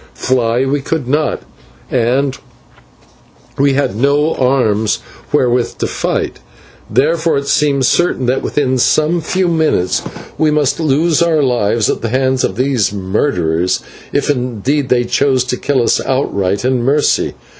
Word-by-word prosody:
Fly 125 0 0
we 140 +1 -1
could 145 -2 -3
not, 150 +3 -1 0.5
and 130 +3 +1 1.2
we 140 0 +3
had 135 -7 0
no 145 +6 +2
arms 110 -5 +1 0.3
wherewith 125 -1 +1
to - - -2
fight, - - -2 0.5
therefore 160 +2 +1
it 140 0 -3
seemed 140 -1 +2
certain 175 -3 +1
that 125 +2 0
within 130 -3 0
some 155 +6 +2
few 185 +3 0
minutes 160 - +1 0.4
we 155 - +3
must 150 -1 +1
lose 160 +2 +1
our 165 -3 +2
lives 115 -4 +1
at - - -1
the 115 - -2
hands 130 +1 +1
of 95 - -1
these 125 -4 +1
murderers, 95 - -1 0.3
if - - 0
indeed 130 +1 -1
they 120 -1 +3
chose 130 +1 +1
to 125 0 -2
kill 135 -1 0
us - - +1
outright 100 -6 -1
in 130 -1 +1
mercy. 140 +4 +1
130 Hz, 145 wpm, -15 LUFS, 120-145 Hz, 1.2 s, we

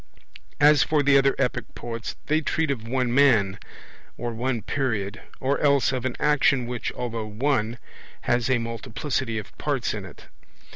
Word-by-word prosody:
As 150 0 +6
for 150 -2 +2
the 140 0 +4
other 135 0 +4
epic 125 -3 -2
poets, 115 -1 -5
they 155 +1 +2
treat 160 0 0
of 115 -4 -4
one 125 -1 0
man, 115 -9 +4 0.6
or 120 0 -3
one 120 -1 -2
period; 110 -7 -2 0.2
or 135 +2 0
else 140 -3 +3
of 130 -2 -3
an 130 - -1
action 145 -3 +3
which, 120 -1 -3
although 115 -3 -4
one, 115 +1 0 0.4
has 120 +1 +1
a 130 - +4
multiplicity 115 +1 -3
of 105 - -7
parts - - -1
in - - -5
it. - - -12
125 Hz, 160 wpm, -25 LUFS, 115-140 Hz, 0.6 s, As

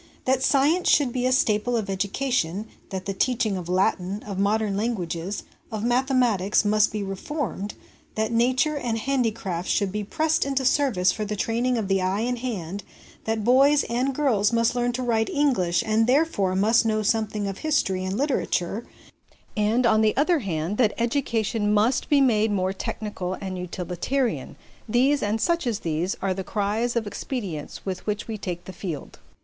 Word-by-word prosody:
That 260 0 +2
science 290 +7 +3
should 275 -5 +3
be 250 0 0
a - - +1
staple 235 -1 +2
of 215 -3 -2
education, 200 0 -1 0.2
that 190 -2 -5
the 200 - -2
teaching 225 0 0
of 180 -2 -5
Latin, 185 +2 0
of 200 -3 -5
modern 205 0 +1
languages, 195 -4 -2 0.3
ot 215 -1 -3
mathematics, 240 -5 +2
must 210 0 +3
be 210 -1 -3
reformed, 205 +1 -4 0.4
that 220 +1 0
nature 255 +6 +2
and 240 -5 -2
handicrafts 220 -8 -1
should 200 -2 +1
be 210 +1 -3
pressed 315 +9 +1
into 275 -1 -1
service 245 -10 +3
for 215 - -4
the 210 0 -3
training 235 +4 0
of 215 -3 -2
the 195 -1 +1
eye 190 +3 0
and 245 +1 -1
hand, 200 -6 -4 0.4
that 220 -1 -1
boys 275 +5 +5
and 255 +3 0
girls 235 -8 +2
must 230 0 +2
learn 245 0 0
to 255 +1 -2
write 225 -2 +1
English 250 - +1
and 220 +1 +2
therefore 250 - +2
must 215 +5 +4
know 215 -1 0
something 215 -1 0
of 195 -1 -5
history 240 -12 0
and 190 +2 -2
literature; 235 - -1 0.7
and, 220 +4 +2
on 220 -1 +4
the 215 +1 +2
other 315 +4 +3
hand, 180 - -3
that 220 -5 +3
education 230 -4 0
must 215 +5 +2
be 285 -2 +5
made 220 -4 +3
more 190 -1 0
technical 190 -2 -4
and 185 -2 -5
utilitarian 180 +9 -2 0.3
these, 265 +5 +3
and 210 +2 0
such 340 +1 +1
as 225 -4 -1
these, 165 +3 -1
are 195 -1 +1
the 190 +1 -4
cries 215 +5 -1
of 235 -2 0
expedience 200 - -5
with 190 0 -5
which 210 0 -2
we 225 - -4
take 180 -4 -5
the 190 - -8
field. 170 -5 -6
220 Hz, 175 wpm, -25 LUFS, 195-250 Hz, 0.7 s, boys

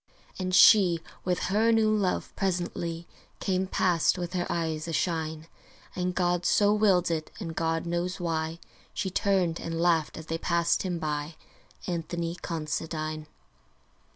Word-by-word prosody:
And 185 -1 0
she, 180 -4 +7 0.2
with 180 -1 0 0.2
her 225 +2 +4
new 220 -1 +3
love, 195 -3 -1
presently 175 -3 -2 0.3
Came 190 -1 0
past 180 -2 +2
with 175 0 -4
her 175 -1 -1
eyes 160 -2 -2
ashine; 160 -1 -2 0.5
And 180 -1 -2
God 175 -1 +1
so 205 +2 +4
willed 195 -5 +3
it, 155 -1 -2
and 165 -6 -5
God 165 0 -1
knows 175 +2 -2
why, 165 -1 -2 0.4
She 190 - -2
turned 185 -4 +1
and 165 0 -4
laughed 165 -3 +2
as 160 - -8
they 165 +1 -3
passed 170 0 +1
him 180 -2 -2
by 150 -1 -3 0.5
Anthony 170 0 -3
Considine. 155 -1 -4
170 Hz, 140 wpm, -28 LUFS, 160-185 Hz, 0.5 s, she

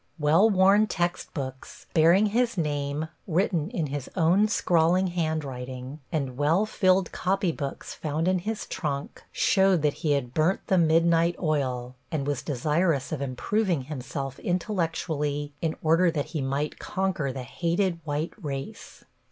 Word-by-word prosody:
Well 160 +8 +4
worn 200 +2 +5
textbooks, 145 -8 -4
bearing 170 +6 +5
his 240 -3 +1
name 145 -1 -2 0.2
written 170 -2 +1
in 180 -9 -2
his 145 -2 -5
own 185 +4 +4
scrawling 175 -2 +2
handwriting, 135 -5 -3
and 135 -6 -2
well 160 +8 +3
filled 190 -3 +2
copybooks 180 -7 -2
found 155 +2 -2
in 185 0 +2
his 215 +4 -4
trunk 145 -6 -4
showed 190 -4 +3
that 150 -1 +3
he 150 -3 +2
had 125 -3 -2
burnt 160 +6 +1
the 190 - +3
midnight 165 +1 +3
oil, 130 -6 -1 0.2
and 145 -4 -1
was 145 -2 -1
desirous 150 +1 0
of 155 -3 -3
improving 165 - 0
himself 135 -1 -5
intellectually 160 -6 -2
in 160 -1 -1
order 165 +3 +4
that 150 -4 -1
he 155 - -1
might 140 +3 -2
conquer 185 -8 -1
the 130 0 -6
hated 170 +5 -1
white 150 +1 -2
race. 135 -2 -6
160 Hz, 140 wpm, -26 LUFS, 140-180 Hz, 0.2 s, worn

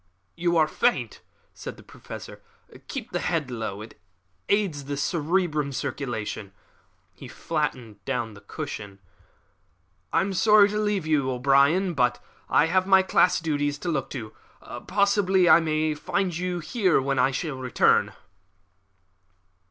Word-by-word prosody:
"You 170 0 +1
are 155 -1 +4
faint," 120 -6 0 0.3
said - - -8
the - - -15
Professor - - -10 0.5
"keep - - -6
the - - -1
head 155 -7 -2
low; 110 -3 -5
it 110 - -15 0.5
aids 185 -9 0
the 145 0 -4
cerebral 155 -1 0
circulation." 110 -7 -4 0.6
He - - -11
flattened 125 - -4
down 115 0 -3
the 105 - -14
cushion. 100 -1 -7 1.1
"I - - +3
am 195 +1 -2
sorry 210 +1 +5
to 210 +1 -2
leave 210 -5 0
you, 150 -4 +1
O'Brien; 140 +8 +3
but 125 -4 +1 0.3
I - - +4
have 185 +3 +1
my 190 -1 +6
class 185 -1 +3
duties 145 -3 -1
to 175 - -4
look 145 -5 -2
to. 110 -5 -7 0.5
Possibly 200 -2 +3
I 165 - +8
may 155 -1 0
find 175 +4 -2
you 180 0 -3
here 185 +2 +1
when 135 0 -1
I 130 +2 +3
return." 130 -5 +1
155 Hz, 135 wpm, -25 LUFS, 130-180 Hz, 1.1 s, I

